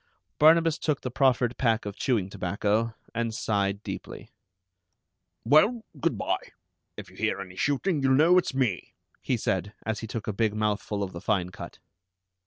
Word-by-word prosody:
Barnabas 165 +1 +5
took 150 -3 -1
the 125 - -4
proffered 125 -2 +2
pack 115 -3 +1
of 100 -1 -5
chewing 115 -8 0
tobacco, 105 +4 -1 0.2
and 115 -1 -2
sighed 100 -2 -1
deeply. - - -7 1.1
"Well, 205 - +4 0.2
good - - 0
by. - - -1 0.6
If - - -9
you - - -18
hear - - 0
any 90 -1 -8
shooting, 145 - 0
you'll 135 -1 +3
know 170 +6 +6
it's 160 - -3
me," 120 - -1 0.3
he - - 0
said, 105 +2 -2
as 110 -1 -2
he 115 - -6
took 115 -1 -5
a 105 - -2
big 110 0 0
mouthful 105 -1 -1
of 95 - -5
the 85 - -7
fine 90 -4 0
cut. - - -9
115 Hz, 170 wpm, -27 LUFS, 100-135 Hz, 1.1 s, know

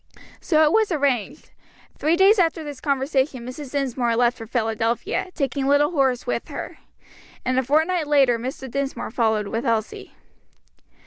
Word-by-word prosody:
So 315 -2 +3
it 300 - +4
was 440 -1 +2
arranged; 280 - -1 0.4
three 315 +3 +1
days 390 +4 +5
after 330 -2 +1
this 290 -3 -8
conversation 270 -2 -1
Mrs. 255 +2 -8
Dinsmore 250 -4 0
left 240 +1 +2
for 225 -2 -9
Philadelphia, 230 - -1
taking 275 -2 -1
little 290 +2 +3
Horace 265 -6 +1
with - - -2
her, - - -7 0.7
and 255 0 +1
a - - 0
fortnight 315 +4 +1
later 270 -5 +3
Mr. 265 +2 -6
Dinsmore 275 -2 -4
followed 220 -3 0
with 225 - -2
Elsie. 225 -4 -2
270 Hz, 150 wpm, -23 LUFS, 240-300 Hz, 0.7 s, days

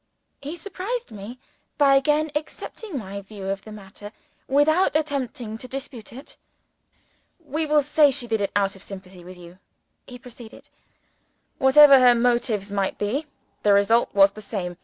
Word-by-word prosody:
He 290 +4 -6
surprised 405 +7 -6
me 215 +4 -9 0.4
by 280 -2 +5
again 300 +3 +1
accepting 310 +4 -6
my 200 -3 -6
view 200 -1 -9
of 195 0 -3
the 215 - -12
matter, 205 0 -11 0.4
without 310 +6 +2
attempting 260 -7 -3
to 255 - -9
dispute 260 -3 -8
it. 265 +4 -12 1.0
"We 310 0 -4
will 300 -1 +3
say 295 +1 +4
she 265 -2 0
did 225 -2 -1
it 200 - -1
out 195 -1 +1
of 195 - -14
sympathy 190 -2 -11
with 180 +1 -12
you," 175 +1 -14 0.5
he 250 - -10
proceeded. 240 -2 -14 0.9
"Whatever 275 +1 +7
her 250 -1 +6
motives 235 -4 0
might 195 -1 -2
be, 260 +10 -2 0.3
the 205 - +3
result 215 +4 +3
was 195 0 +6
the 215 - -12
same. 185 -4 -5
240 Hz, 160 wpm, -23 LUFS, 200-290 Hz, 1.0 s, Whatever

